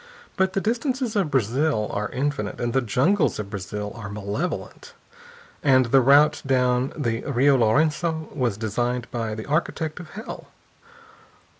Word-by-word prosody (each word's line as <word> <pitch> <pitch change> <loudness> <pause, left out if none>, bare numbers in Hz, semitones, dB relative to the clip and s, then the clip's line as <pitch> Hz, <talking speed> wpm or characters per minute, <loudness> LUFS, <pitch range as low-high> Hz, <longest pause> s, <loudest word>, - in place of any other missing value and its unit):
But 190 -1 +1
the 195 - 0
distances 245 +1 -1
of 195 -7 +1
Brazil 130 -2 +1
are 105 0 -2
infinite, 130 -6 -2
and 120 -1 -1
the 135 - +3
jungles 145 - +2
of 100 -2 -6
Brazil 105 +1 -5
are 105 -3 -8
malevolent, 105 - -5 0.7
and 130 -3 +4
the 135 - +6
route 145 +4 +5
down 125 -1 +1
the 115 -6 -1
Rio 140 0 +3
Laurenço 155 +7 +1
was 120 -8 0
designed 120 +3 -1
by 115 -3 -3
the 110 - -6
architect 155 +1 -1
of 175 -3 -10
hell. 220 +4 -8
130 Hz, 145 wpm, -24 LUFS, 110-155 Hz, 0.7 s, the